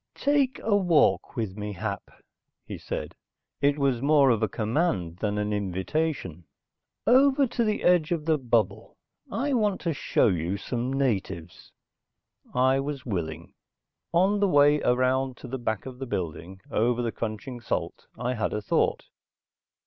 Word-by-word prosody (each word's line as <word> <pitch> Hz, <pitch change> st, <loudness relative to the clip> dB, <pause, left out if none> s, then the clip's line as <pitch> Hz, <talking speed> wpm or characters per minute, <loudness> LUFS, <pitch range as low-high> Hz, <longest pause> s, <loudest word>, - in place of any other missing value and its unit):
"Take 280 Hz, -3 st, +2 dB
a 215 Hz, -2 st, +2 dB
walk 175 Hz, -9 st, +3 dB
with 110 Hz, -6 st, -3 dB
me, 105 Hz, 0 st, -5 dB
Hap," 100 Hz, 0 st, -5 dB, 0.6 s
he -, -, -7 dB
said. -, -, -5 dB, 0.5 s
It 145 Hz, +1 st, +3 dB
was 135 Hz, -4 st, +1 dB
more 140 Hz, -2 st, +5 dB
of 115 Hz, -2 st, +1 dB
a 110 Hz, -, +1 dB
command 105 Hz, -, -1 dB
than 105 Hz, +1 st, -2 dB
an 105 Hz, 0 st, -1 dB
invitation. 95 Hz, -, -2 dB, 0.6 s
"Over 270 Hz, +3 st, +5 dB
to 240 Hz, -1 st, -1 dB
the 215 Hz, -2 st, -1 dB
edge 175 Hz, -3 st, +3 dB
of 165 Hz, -3 st, -1 dB
the 160 Hz, -2 st, +2 dB
bubble. 110 Hz, -4 st, -1 dB, 0.3 s
I 285 Hz, +1 st, -1 dB
want 210 Hz, -5 st, +1 dB
to 170 Hz, -2 st, -1 dB
show -, -, +1 dB
you 90 Hz, 0 st, 0 dB
some 125 Hz, +4 st, -3 dB
natives." 95 Hz, -11 st, -2 dB, 0.8 s
I 130 Hz, +1 st, +3 dB
was 140 Hz, -2 st, -4 dB
willing. 85 Hz, -7 st, -4 dB, 0.6 s
On 190 Hz, +4 st, +3 dB
the 200 Hz, -, +3 dB
way 145 Hz, -1 st, +5 dB
around 130 Hz, +1 st, +1 dB
to -, -, -10 dB
the 130 Hz, +2 st, -4 dB
back 110 Hz, -4 st, -2 dB
of 130 Hz, -1 st, -8 dB
the 135 Hz, -, -5 dB
building, 90 Hz, -1 st, -5 dB
over 120 Hz, +2 st, +1 dB
the 115 Hz, -, -1 dB
crunching 115 Hz, +3 st, -5 dB
salt, -, -, -4 dB
I 125 Hz, +1 st, -1 dB
had 110 Hz, -, -2 dB
a 105 Hz, -, -2 dB
thought. -, -, +1 dB
125 Hz, 155 wpm, -26 LUFS, 105-155 Hz, 0.8 s, more